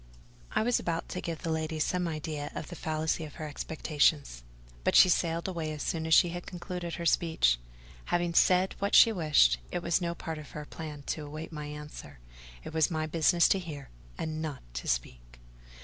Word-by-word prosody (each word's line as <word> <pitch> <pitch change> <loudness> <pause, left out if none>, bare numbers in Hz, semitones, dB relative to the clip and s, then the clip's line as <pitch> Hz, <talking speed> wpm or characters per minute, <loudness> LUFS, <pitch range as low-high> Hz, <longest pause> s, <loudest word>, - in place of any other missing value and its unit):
I - - +2
was 245 +1 +2
about 165 -1 -2
to 180 - -4
give 165 0 -5
the 165 - -1
lady 160 0 -2
some 180 +3 0
idea 155 -2 -4
of - - -5
the 175 - -7
fallacy 160 0 -1
of 150 - -9
her 155 -2 -5
expectations; 145 - 0 0.4
but - - +2
she 185 - +9
sailed 170 0 +1
away 165 -4 -3
as 150 - -5
soon 160 -1 -2
as 160 - +3
she 175 - +6
had 175 +1 -6
concluded 180 -1 -5
her 170 - -5
speech. 160 - +3 0.5
Having 175 -1 0
said 185 +2 +4
what 200 +1 +1
she 230 - +9
wished, 150 - +4
it 175 - -3
was 170 +1 +1
no 170 -1 -2
part 160 -2 -5
of 150 - -10
her 150 - -6
plan 150 -2 -8
to 150 +1 -4
await 155 +3 -7
my 150 -2 -6
answer: 150 - -9 0.5
it - - -8
was 160 -1 +3
my 155 -2 -1
business 165 +2 +3
to 195 - +3
hear, 150 -6 -8 0.3
and 155 0 -3
not 155 -4 -5
to - - -5
speak. - - -3
160 Hz, 200 wpm, -30 LUFS, 150-170 Hz, 0.5 s, she